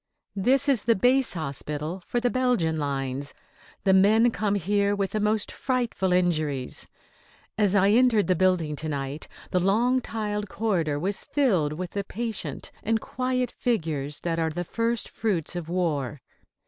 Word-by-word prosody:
This 260 Hz, +8 st, +2 dB
is 270 Hz, -6 st, +2 dB
the 230 Hz, -, +4 dB
base 250 Hz, +2 st, +3 dB
hospital 150 Hz, +2 st, -4 dB
for 240 Hz, -, 0 dB
the 245 Hz, 0 st, +1 dB
Belgian 240 Hz, -12 st, +1 dB
lines. 140 Hz, -1 st, -3 dB, 0.5 s
The 190 Hz, -, +4 dB
men 215 Hz, +5 st, +5 dB
come 205 Hz, 0 st, 0 dB
here 200 Hz, +2 st, +1 dB
with 195 Hz, -1 st, -1 dB
the 215 Hz, -, -1 dB
most 210 Hz, 0 st, 0 dB
frightful 240 Hz, -7 st, -1 dB
injuries. 155 Hz, -7 st, 0 dB, 0.7 s
As 205 Hz, -2 st, +2 dB
I 200 Hz, 0 st, +5 dB
entered 230 Hz, -2 st, +4 dB
the 185 Hz, -, +3 dB
building 175 Hz, -4 st, +2 dB
to 155 Hz, +1 st, -4 dB
night 140 Hz, 0 st, -4 dB, 0.2 s
the 180 Hz, -, +2 dB
long 235 Hz, +8 st, +2 dB
tiled 210 Hz, -3 st, -3 dB
corridor 175 Hz, -9 st, 0 dB
was 195 Hz, +5 st, -2 dB
filled 190 Hz, -, +1 dB
with 180 Hz, +2 st, -5 dB
the 200 Hz, -, -2 dB
patient 225 Hz, +2 st, -4 dB
and 225 Hz, +1 st, +1 dB
quiet 255 Hz, +1 st, -2 dB
figures 155 Hz, -, -2 dB
that 165 Hz, -1 st, -1 dB
are 160 Hz, -1 st, +1 dB
the 175 Hz, +3 st, -3 dB
first 230 Hz, +5 st, -1 dB
fruits 180 Hz, -7 st, -2 dB
of 170 Hz, -2 st, -5 dB
war. 150 Hz, -7 st, -1 dB
195 Hz, 160 wpm, -26 LUFS, 160-225 Hz, 0.7 s, men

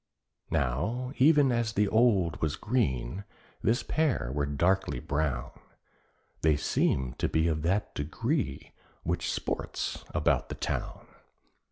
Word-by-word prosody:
Now 80 Hz, -, -1 dB
even 145 Hz, -1 st, +5 dB
as 115 Hz, -2 st, 0 dB
the 105 Hz, 0 st, +2 dB
old 100 Hz, -7 st, +3 dB
was 80 Hz, -2 st, 0 dB
green, 95 Hz, -, -1 dB, 0.4 s
this 120 Hz, +4 st, +2 dB
pair 135 Hz, -, 0 dB
were 70 Hz, 0 st, 0 dB
darkly 85 Hz, +1 st, +1 dB
brown; 70 Hz, -2 st, -1 dB, 0.9 s
They 75 Hz, -2 st, +4 dB
seemed 65 Hz, -3 st, 0 dB
to -, -, +1 dB
be 80 Hz, +1 st, +2 dB
of 80 Hz, -2 st, 0 dB
that 95 Hz, +6 st, 0 dB
degree 80 Hz, -, -2 dB, 0.3 s
which -, -, -1 dB
sports -, -, -3 dB
about -, -, +1 dB
the -, -, -4 dB
town. -, -, -4 dB
85 Hz, 125 wpm, -29 LUFS, 70-120 Hz, 0.9 s, even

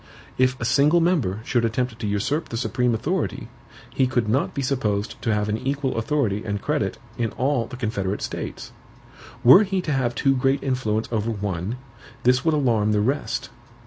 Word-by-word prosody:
"If 130 Hz, 0 st, +2 dB
a 120 Hz, -, -2 dB
single 150 Hz, +7 st, +4 dB
member 145 Hz, -, +1 dB
should 120 Hz, -3 st, +1 dB
attempt 115 Hz, +1 st, -1 dB
to 110 Hz, -, -3 dB
usurp 105 Hz, +10 st, -1 dB
the 115 Hz, -, -4 dB
supreme 125 Hz, 0 st, 0 dB
authority, 155 Hz, -, -2 dB, 0.4 s
he 130 Hz, -, +2 dB
could 120 Hz, -4 st, 0 dB
not 125 Hz, +6 st, 0 dB
be 140 Hz, -, -1 dB
supposed 110 Hz, -6 st, -1 dB
to 115 Hz, -, 0 dB
have 105 Hz, -1 st, 0 dB
an 105 Hz, +1 st, -1 dB
equal 135 Hz, +1 st, -2 dB
authority 115 Hz, -4 st, 0 dB
and 105 Hz, -1 st, -2 dB
credit 150 Hz, +7 st, -1 dB, 0.2 s
in 115 Hz, -2 st, +1 dB
all 130 Hz, -3 st, 0 dB
the 130 Hz, -, -8 dB
confederate 105 Hz, -5 st, -2 dB
states. -, -, -5 dB, 0.7 s
Were 130 Hz, -, +9 dB
he 195 Hz, -2 st, 0 dB
to 160 Hz, -, -3 dB
have 130 Hz, -4 st, 0 dB
too 135 Hz, +3 st, +3 dB
great 135 Hz, +2 st, +1 dB
influence 115 Hz, -5 st, -1 dB
over 110 Hz, -1 st, -1 dB
one, 100 Hz, -1 st, -3 dB, 0.5 s
this 125 Hz, 0 st, +3 dB
would 160 Hz, -1 st, +2 dB
alarm 115 Hz, -7 st, +2 dB
the 105 Hz, -, +2 dB
rest. 130 Hz, +8 st, -1 dB
125 Hz, 180 wpm, -23 LUFS, 110-135 Hz, 0.7 s, Were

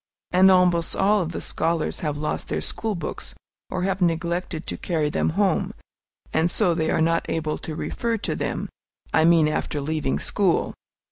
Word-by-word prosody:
And 185 Hz, +1 st, +6 dB
almost 180 Hz, -3 st, +3 dB
all 205 Hz, +1 st, +3 dB
of 170 Hz, -1 st, -3 dB
the -, -, -4 dB
scholars 165 Hz, -1 st, -1 dB
have 150 Hz, -2 st, -2 dB
lost 150 Hz, +1 st, -3 dB
their -, -, -1 dB
school 220 Hz, -2 st, -3 dB
books, 170 Hz, -3 st, -5 dB, 0.3 s
or 180 Hz, -, -2 dB
have 195 Hz, 0 st, -1 dB
neglected 170 Hz, 0 st, -1 dB
to -, -, -4 dB
carry 155 Hz, -4 st, -1 dB
them -, -, +1 dB
home, 195 Hz, -5 st, +1 dB, 0.6 s
and 160 Hz, +2 st, +3 dB
so 180 Hz, -1 st, +2 dB
they 160 Hz, -1 st, 0 dB
are -, -, +2 dB
not 165 Hz, +1 st, +1 dB
able 155 Hz, -1 st, -1 dB
to 155 Hz, -, -6 dB
refer 230 Hz, +7 st, -2 dB
to 210 Hz, -, -2 dB
them, -, -, -2 dB, 0.5 s
I 160 Hz, -, +5 dB
mean, 165 Hz, -2 st, +5 dB
after 150 Hz, -1 st, -1 dB
leaving 150 Hz, -1 st, -1 dB
school. 195 Hz, -5 st, +1 dB
170 Hz, 180 wpm, -24 LUFS, 160-185 Hz, 0.6 s, And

